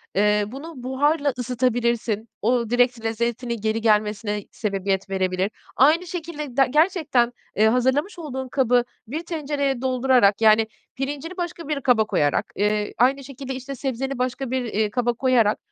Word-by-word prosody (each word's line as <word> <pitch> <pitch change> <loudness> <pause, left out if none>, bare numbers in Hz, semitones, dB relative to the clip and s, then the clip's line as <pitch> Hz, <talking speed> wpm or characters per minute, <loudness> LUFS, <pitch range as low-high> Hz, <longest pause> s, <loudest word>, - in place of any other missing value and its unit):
eee, 210 +1 +3
bunu 280 +9 -8
buharla 285 +2 +1
ısıtabilirsin. 235 -3 0
O, 235 0 +1
direkt 245 -1 +2
lezzetini 235 +1 -1
geri 220 +1 0
gelmesine 210 -1 +1
sebebiyet 195 -2 -2
verebilir. 190 +1 0 0.2
Aynı 320 +7 +4
şekilde 310 -6 -6
de 270 -1 +5
gerçekten, 300 -6 +2 0.2
eee, 215 +1 +4
hazırlamış 260 - +1
olduğun 265 -5 -5
kabı 250 -2 +2 0.2
bir 310 +8 -4
tencereye 285 -5 -2
doldurarak, 255 -5 +3
yani, 220 0 +5 0.3
pirincini 290 +7 -4
başka 345 -3 -5
bir 295 -3 -2
kaba 235 -4 +3
koyarak, 145 -8 +1
eee, 210 +1 0
aynı 270 +4 +3
şekilde, 265 0 -7
işte, 265 +2 -6
sebzeni 270 0 -3
başka 255 0 -2
bir, 260 -1 0
iii, 215 -1 0
kaba 240 +2 0
koyarak 235 -4 +2
250 Hz, 145 wpm, -23 LUFS, 220-275 Hz, 0.3 s, de